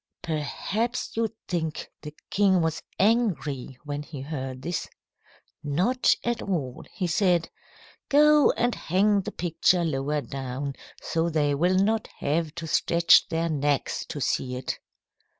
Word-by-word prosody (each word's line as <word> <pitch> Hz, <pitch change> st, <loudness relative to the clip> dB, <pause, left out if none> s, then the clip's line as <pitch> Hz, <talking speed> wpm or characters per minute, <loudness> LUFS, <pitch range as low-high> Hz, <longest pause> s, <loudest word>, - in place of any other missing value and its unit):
"Perhaps 195 Hz, -, -2 dB
you 225 Hz, 0 st, +1 dB, 0.2 s
think 160 Hz, -3 st, -3 dB
the 150 Hz, 0 st, -9 dB, 0.2 s
king 195 Hz, -2 st, +4 dB
was 160 Hz, -1 st, -1 dB, 0.2 s
angry 185 Hz, -, +1 dB
when 145 Hz, 0 st, -4 dB
he 150 Hz, -1 st, -8 dB
heard 135 Hz, -3 st, -5 dB
this. 170 Hz, +2 st, -3 dB, 0.7 s
Not 180 Hz, -, +2 dB
at 240 Hz, 0 st, -1 dB
all. 145 Hz, -10 st, -3 dB
He 185 Hz, -, -3 dB
said, 175 Hz, -1 st, +2 dB, 0.6 s
'Go 300 Hz, 0 st, +6 dB
and 240 Hz, 0 st, +1 dB
hang 200 Hz, +4 st, +2 dB
the 215 Hz, +2 st, -6 dB
picture 175 Hz, 0 st, +1 dB
lower 150 Hz, -1 st, -1 dB
down, 135 Hz, +1 st, -5 dB, 0.3 s
so 165 Hz, +1 st, 0 dB
they 150 Hz, -3 st, +1 dB
will 175 Hz, +6 st, +2 dB
not 215 Hz, +3 st, +2 dB
have 155 Hz, +1 st, -1 dB
to 170 Hz, -1 st, -5 dB
stretch 170 Hz, +1 st, +4 dB
their 165 Hz, +1 st, 0 dB
necks 145 Hz, -3 st, 0 dB
to -, -, -5 dB
see 125 Hz, -1 st, -1 dB
it.' 125 Hz, -, -4 dB
165 Hz, 135 wpm, -26 LUFS, 145-195 Hz, 0.7 s, Go